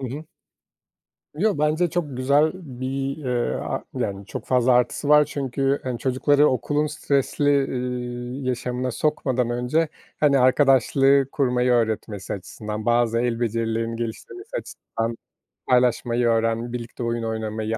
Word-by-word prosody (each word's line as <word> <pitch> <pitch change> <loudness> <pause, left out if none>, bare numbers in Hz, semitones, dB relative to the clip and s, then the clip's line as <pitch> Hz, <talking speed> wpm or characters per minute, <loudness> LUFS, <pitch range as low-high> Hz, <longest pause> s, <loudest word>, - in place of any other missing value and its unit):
Hı 130 - -3
hı. 145 +6 -7 1.1
Yo, 205 0 +1
bence 155 +3 +1
çok 150 -7 -3
güzel 140 +4 +3
bir, 135 -4 -4
eee, 125 -5 -1
a - - -3
yani 100 0 -3
çok - - -7
fazla 125 0 +3
artısı 125 +4 +1
var 150 0 +7
çünkü, 135 0 -1
hani, 125 -2 -3
çocukları 145 +3 +3
okulun 145 +3 0
stresli, 145 -1 +1
ııı, 125 +1 -4
yaşamına 125 0 -2
sokmadan 130 -3 0
önce, 125 +7 0 0.3
hani, 140 -2 +4
arkadaşlığı 135 +1 +4
kurmayı 125 -2 +1
öğretmesi 110 -4 -1
açısından, 105 +2 -6
bazı 120 -1 +2
el 120 -1 0
becerilerinin 115 0 -1
geliştirilmesi 360 - -6
açısından, 115 - -5 0.5
paylaşmayı 125 -1 +2
öğren 115 +1 0
birlikte 120 0 -6
oyun 115 0 -1
oynamayı, 110 0 -3
125 Hz, 130 wpm, -23 LUFS, 115-140 Hz, 1.1 s, var